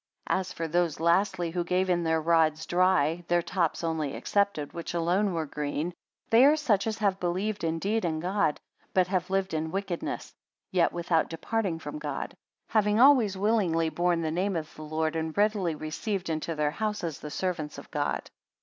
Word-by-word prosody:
77 - - +2
As 190 - -5
for 165 - -3
those, 170 -1 0
lastly, 175 +1 +2
who 175 +1 -1
gave 180 +2 +1
in 175 -2 +1
their 160 -1 +2
rods 160 -1 +2
dry, 175 -2 +2
their 175 0 +2
tops 175 -3 -1
only 160 -4 -1
excepted, 200 -8 0
which 170 0 -5
alone 180 +4 +2
were 165 -2 -1
green; 150 +4 -3 0.4
they 230 +3 +7
are 290 +3 +7
such 230 -10 +1
as 220 -1 -1
have 200 -3 +1
believed 190 +4 -1
indeed 190 +7 0
in 160 -2 -1
God, 180 -2 0 0.4
but 185 -1 +5
have 180 0 -1
lived 195 -1 0
in 160 0 -1
wickedness; 195 -2 -4 0.4
yet 180 -2 +3
without 170 -1 +1
departing 190 +1 -2
from 295 - -6
God: - - -4 0.4
having 210 -1 +2
always 245 -7 +6
willingly 190 -6 +2
borne 175 +1 +1
the 160 - -1
name 185 +4 0
of 155 -2 -4
the - - -11
Lord, 155 +1 -1
and 160 +1 -3
readily 205 -5 +2
received 180 +4 -3
into 160 +1 -2
their 150 -1 +1
houses 210 -5 -3
the 150 - -7
servants 155 -2 -3
of - - -11
God. - - -1
175 Hz, 185 wpm, -28 LUFS, 160-195 Hz, 0.4 s, they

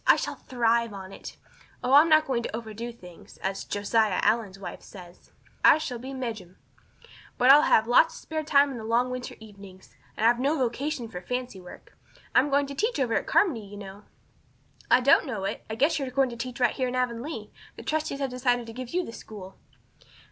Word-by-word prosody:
I - - +8
shall - - -3
thrive 235 -2 0
on 190 -1 -9
it. - - -10 0.5
Oh, 250 +2 +1
I'm 300 +4 +7
not 310 0 +5
going 255 -4 -1
to 230 - -5
overdo 230 +1 -6
things. 180 -7 -15
As 195 0 -2
'Josiah 205 -1 0
Allen's 215 -3 +1
wife,' 195 - -8
says, 180 -3 -14 0.3
I - - +8
shall 260 -6 -5
be 260 +3 -7
'mejum'. 220 -9 -6 0.8
But 250 +2 +6
I'll 290 +2 +8
have 220 - +5
lots 245 +7 +4
of - - -10
spare 315 -1 -4
time 285 -2 +4
in 255 - -6
the - - -8
long 235 +3 +1
winter 255 0 -6
evenings, 200 -3 -14 0.2
and 220 - 0
I've 235 +1 +4
no 285 +5 +1
vocation 255 +1 -2
for 180 -5 -8
fancy 250 -2 -5
work. 180 - -14 0.4
I'm 275 +3 +4
going 285 0 +2
to 280 - -7
teach 435 - -1
over 245 -4 0
at - - -1
Carmody, 330 - +2
you 205 0 -11
know." 200 0 -10 0.9
"I 255 - +5
don't 280 +4 +4
know 220 -7 -4
it. 195 +2 -4
I 220 - -3
guess 300 +6 +2
you're 270 -2 -3
going 270 -1 +1
to - - -7
teach 245 +2 -6
right 245 -2 +3
here 255 - -1
in 250 - -4
Avonlea. 250 +4 -3 0.2
The - - -10
trustees 305 -2 -2
have 270 -2 -1
decided 245 -1 0
to 225 - -9
give 255 +5 -7
you 360 -1 +1
the 230 - -9
school." 195 -5 -10
240 Hz, 215 wpm, -26 LUFS, 215-270 Hz, 0.9 s, I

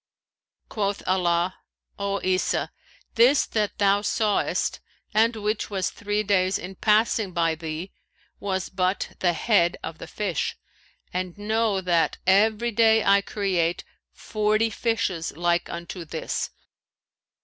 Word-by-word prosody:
Quoth 200 -2 -2
Allah, 180 -1 +1 0.4
'O 200 0 -1
Isa, 185 0 0 0.4
this 250 +5 +5
that 210 -2 -1
thou 200 0 +3
sawest 210 0 0 0.3
and 225 +2 +3
which 215 0 -2
was 195 -3 -1
three 205 0 -2
days 190 -2 +2
in 185 +2 -7
passing 210 -1 +2
by 165 -2 +2
thee, 160 +3 -6 0.5
was 190 -2 -2
but 185 0 -1
the 175 -2 +2
head 175 -1 +2
of 160 0 -6
the - - -8
fish;[FN#533] 195 -7 -2 0.6
and 180 0 -3
know 215 -1 0
that 175 -3 +1
every 215 +5 +3
day 225 -1 +4
I 200 0 +5
create 185 -5 -1 0.3
forty 215 +1 0
fishes 200 -9 -1
like 175 0 +1
unto 170 +1 -6
this.' 160 0 -3
195 Hz, 125 wpm, -25 LUFS, 180-215 Hz, 0.6 s, this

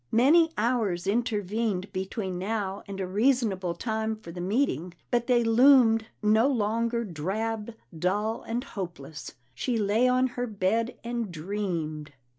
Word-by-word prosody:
Many 305 +9 +5
hours 210 -6 0
intervened 210 -2 -1
between 190 -1 -3
now 200 0 -2
and 195 -1 -6
a 190 - -1
reasonable 200 -4 +1
time 220 +2 -2
for 215 -6 -11
the 175 +1 -6
meeting, 180 - 0 0.2
but 240 -1 +1
they 245 -2 +4
loomed 225 -1 +5 0.2
no 220 +4 +4
longer 230 -1 0
drab, 215 +5 -3 0.2
dull, 205 +7 -1
and 235 +2 -3
hopeless. 160 -6 -7 0.2
She 240 - -1
lay 215 +4 +2
on 255 +1 +3
her 245 0 -3
bed 220 +3 0
and 235 -4 -3
dreamed. 160 -4 -4
215 Hz, 135 wpm, -27 LUFS, 185-235 Hz, 0.2 s, Many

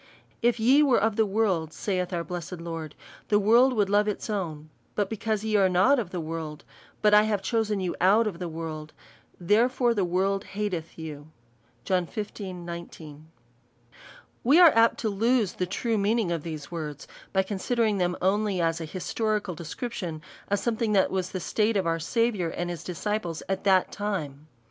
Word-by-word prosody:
" - - -35
If 240 - -12
ye 260 +6 +5
were 275 -5 +4
of 220 +1 +1
the 220 -1 +2
world/' 190 -6 0
saith 185 -3 -2
our 170 -2 -2
blessed 175 0 -6
Lord, 165 -2 -6 0.2
'' - - -21
the 205 - +4
world 235 +6 +5
would 210 -4 +2
love 205 +1 +3
its 210 +1 -3
own; 155 -6 -4 0.2
but 205 -1 -1
because 220 -1 -2
ye 220 -1 0
are 190 -2 +4
not 190 +10 +4
of 210 -7 -3
the 180 - -4
world, 160 -2 -5 0.4
but 210 0 +5
I 210 - +8
have 205 -3 -1
chosen 215 -1 0
you 185 -2 -2
out 205 +5 +5
of 190 -6 -3
the 175 -2 -4
world, 155 -1 -6 0.5
therefore 235 +6 +3
the 205 -4 0
world 190 +3 0
hateth 180 -6 -3
you." 150 -2 -8 0.6
John 180 -3 +1
xv. 205 -3 -6
19. 170 -3 -9 1.2
We 280 +8 +5
are 345 -3 +9
apt 230 0 +5
to 220 - 0
lose 220 0 +1
the 180 - -2
true 225 +4 -1
meaning; 210 -2 +1
of 165 -2 -1
these 155 -2 -7
words, 150 -4 -6 0.2
by 190 0 +2
considering 210 +2 0
them 180 0 0
only 200 0 +1
as 165 0 0
an 160 - -5
historical 210 +3 -2
de 170 +1 -9
scription 175 -5 -5 0.2
of 205 - +1
something 225 0 -1
that 195 -2 +3
was 185 -1 -1
the 185 - -4
state 215 +4 +1
of 190 - 0
our 165 0 0
Sa 230 +8 -1
viour 205 -8 +1
and 175 0 -2
his 170 -2 -6
disciples 180 -2 -3
at 195 +1 -2
that 190 -2 +4
time. 155 -8 -4
190 Hz, 190 wpm, -27 LUFS, 170-215 Hz, 1.2 s, are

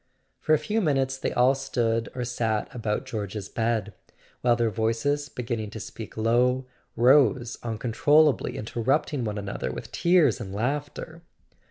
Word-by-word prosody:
For 155 - +3
a - - +2
few 210 +9 -1
minutes 135 -6 +1
they 130 - -3
all 125 +2 +4
stood 115 -4 -1
or 125 - -2
sat 115 -3 -2
about 115 +1 -2
George's 105 -5 -5
bed, 115 -2 -1 0.5
while 120 -1 +4
their 120 -2 +1
voices, 115 +7 0
beginning 115 -4 -4
to 110 - -8
speak 110 +1 -9
low, 125 +3 +2 0.3
rose 130 -1 +4
uncontrollably, 125 +5 +2
interrupting 130 +4 -1
one 105 -1 -3
another 100 0 -4
with - - -8
tears 170 - +3
and 95 0 -6
laughter. 145 +7 -3
120 Hz, 145 wpm, -26 LUFS, 110-140 Hz, 0.5 s, all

